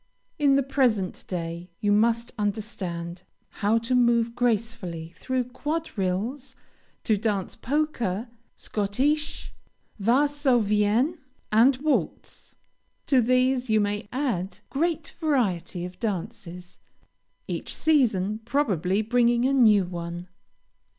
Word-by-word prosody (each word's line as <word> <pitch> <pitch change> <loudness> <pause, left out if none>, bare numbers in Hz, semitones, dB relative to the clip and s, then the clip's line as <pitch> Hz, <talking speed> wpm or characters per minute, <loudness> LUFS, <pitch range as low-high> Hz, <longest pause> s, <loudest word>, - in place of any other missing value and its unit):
In 280 -2 +4
the 275 - +3
present 245 -8 0
day, 170 0 -5
you 205 - +1
must 230 +3 +2
understand 190 -5 -3 0.4
how 210 +2 +3
to 230 +2 -1
move 235 -2 +3
gracefully 220 -8 -1
through 260 -1 -1
quadrilles, 250 - -3 0.5
to 215 - +2
dance 205 -3 -1
polka, 240 -8 -1 0.3
Schottische, 270 +9 -1 0.5
Varsovienne, 245 - +2 0.3
and 240 +5 +5
waltz. 310 -2 -2 0.5
To 265 -3 +4
these 255 +1 +2
you 220 0 +4
may 205 0 -1
add 205 -9 -2
great 320 +1 -1
variety 195 - 0
of 180 0 -10
dances, 180 -3 -5 0.7
each - - -4
season, 220 -10 +2
probably, 210 - +1
bringing 240 +1 +3
a 270 - +2
new 215 -7 +5
one. 175 0 -6
225 Hz, 105 wpm, -26 LUFS, 195-260 Hz, 0.7 s, and